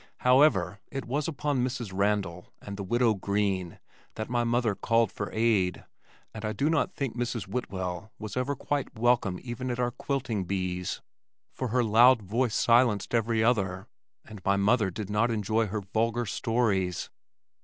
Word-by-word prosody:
However, 125 - +4
it 135 -2 -4
was 140 +5 -1
upon 145 -4 -1
Mrs. 125 -5 -3
Randal 100 -3 -1
and 100 - -7
the 100 - -6
widow 120 +3 +2
Green 100 -3 -1 0.4
that 110 +2 -5
my 120 -1 +2
mother 120 -2 +1
called 115 +1 +1
for 100 - -4
aid, 110 -5 +1 0.5
and 110 - -8
I 110 0 -2
do 145 +9 +1
not 160 - 0
think 135 -5 -3
Mrs. 120 -3 -2
Whitwell 95 -2 -4
was 105 -2 -7
ever 130 +3 -1
quite 145 -5 -3
welcome 115 -5 +2
even 125 +1 -4
at 120 0 -3
our 120 0 +1
quilting 120 -7 -2
bees, 90 -1 -3 0.5
for 130 - -3
her 125 +2 +1
loud 115 +2 +6
voice 115 +4 0
silenced 115 -4 +3
every 115 -1 +2
other, 95 -5 +1 0.4
and 105 -4 -11
my 100 0 +3
mother 105 +1 +3
did 105 +2 -6
not 110 +3 +2
enjoy 110 0 0
her 105 +2 -3
vulgar 115 +4 -1
stories. 100 -6 0
110 Hz, 165 wpm, -28 LUFS, 100-125 Hz, 0.5 s, loud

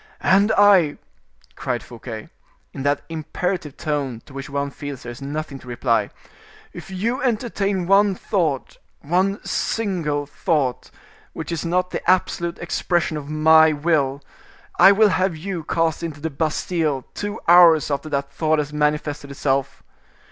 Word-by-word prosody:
"And 200 +3 +4
I," 190 -8 +5 0.6
cried - - -3
Fouquet, - - -9 0.4
in 135 - -6
that 145 +1 0
imperative 165 0 -4
tone 140 -6 -2
to 140 - -15
which 135 +1 -7
one 140 0 -2
feels 140 -2 -7
there 120 - -6
is 120 - -11
nothing 145 0 -5
to 130 - -16
reply, 115 -3 0 0.6
"if - - -10
you 215 +7 -2
entertain 210 -6 -1
one 195 +1 +4
thought, 165 -10 -2 0.2
one 185 +6 +1
single 170 -10 -1
thought, 140 -3 -1 0.4
which 160 - -6
is 170 - -2
not 180 +2 0
the - - -3
absolute 175 -2 +1
expression 175 -1 -1
of 145 -1 -6
my 160 +1 +5
will, 145 -3 0 0.6
I 195 - +9
will 210 +1 +5
have 185 -3 0
you 175 0 -5
cast 165 -1 0
into 160 -3 -5
the 160 +2 -4
Bastile 155 -1 -1
two 205 0 -4
hours 170 -3 +6
after 145 +2 -2
that 140 -1 -2
thought 155 -1 +1
has 150 0 -2
manifested 150 -1 -1
itself. 135 -1 -2
155 Hz, 150 wpm, -22 LUFS, 145-180 Hz, 0.6 s, I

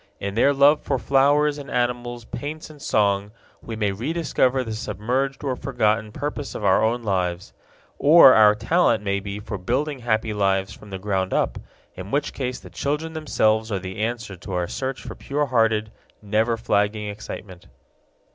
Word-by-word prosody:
In 100 0 -4
their 120 +6 +4
love 145 +2 +5
for - - -1
flowers 145 +2 +3
and 140 -2 -9
animals, 120 -1 -2
paints 155 +2 -6
and 150 -2 -15
song, 100 -3 +1 0.3
we 115 - -6
may 105 -2 0
rediscover 130 - 0
the 110 -2 -5
submerged 120 +7 -2
or 135 -3 -1
forgotten 110 -5 0
purpose 145 +3 -5
of 105 - -4
our 95 +2 +4
own 115 +2 0
lives. 90 -2 -2 0.5
Or 150 -3 +8
our 105 -1 +6
talent 115 - +2
may 100 -1 0
be 100 0 -6
for 105 -1 -6
building 135 +9 -1
happy 110 -2 0
lives 95 -1 0
from 105 - -14
the 95 - -5
ground 95 -1 -1
up, - - 0 0.3
in 95 +1 -8
which 145 +5 -1
case 125 -2 -3
the - - -13
children 150 +3 -2
themselves 110 -8 +1
are 100 - 0
the 95 +1 -7
answer 115 -3 -3
to 95 +2 -8
our 90 -1 -1
search 130 +5 -4
for - - -7
pure 145 +2 -2
hearted, 115 -4 +1 0.3
never 110 +3 0
flagging 105 -1 0
excitement. 100 -3 -8
110 Hz, 175 wpm, -23 LUFS, 100-135 Hz, 0.5 s, Or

